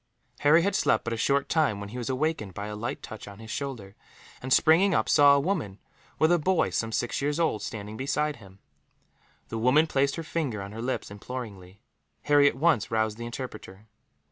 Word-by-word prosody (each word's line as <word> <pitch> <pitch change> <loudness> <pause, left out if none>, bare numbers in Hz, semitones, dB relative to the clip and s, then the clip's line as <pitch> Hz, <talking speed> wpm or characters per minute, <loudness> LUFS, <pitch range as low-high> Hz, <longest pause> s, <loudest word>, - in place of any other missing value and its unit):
Harry 155 +3 +5
had 200 +1 +1
slept - - +2
but 115 - -3
a - - -1
short 140 +4 +1
time 150 -11 +1
when 100 0 -7
he 120 - -8
was 120 - -4
awakened 130 - -2
by 100 - -5
a 105 0 -5
light 115 +3 -5
touch 110 - -9
on 100 -1 -10
his 110 +1 -10
shoulder 115 -9 -5 0.5
and, 130 - -6
springing 170 +8 +5
up, - - +1
saw 145 -1 +6
a - - +3
woman, 140 - -2 0.4
with 160 +2 +3
a 175 - +4
boy 185 +3 +1
some 115 0 -2
six 120 +3 -2
years 145 +3 -1
old, 160 -11 +1
standing 105 0 -6
beside 145 +2 -1
him. 95 -4 -16 0.9
The 115 - -4
woman 130 +7 +4
placed 140 -2 0
her 165 - -5
finger 155 -9 -3
on 100 0 -7
her 110 +2 -7
lips, 125 -3 -3
imploringly. 100 -3 -8 0.4
Harry 145 -1 +5
at 140 - +1
once 145 -5 +2
roused 110 -1 -1
the 120 - -5
interpreter. 110 -5 -8
125 Hz, 205 wpm, -27 LUFS, 105-150 Hz, 0.9 s, saw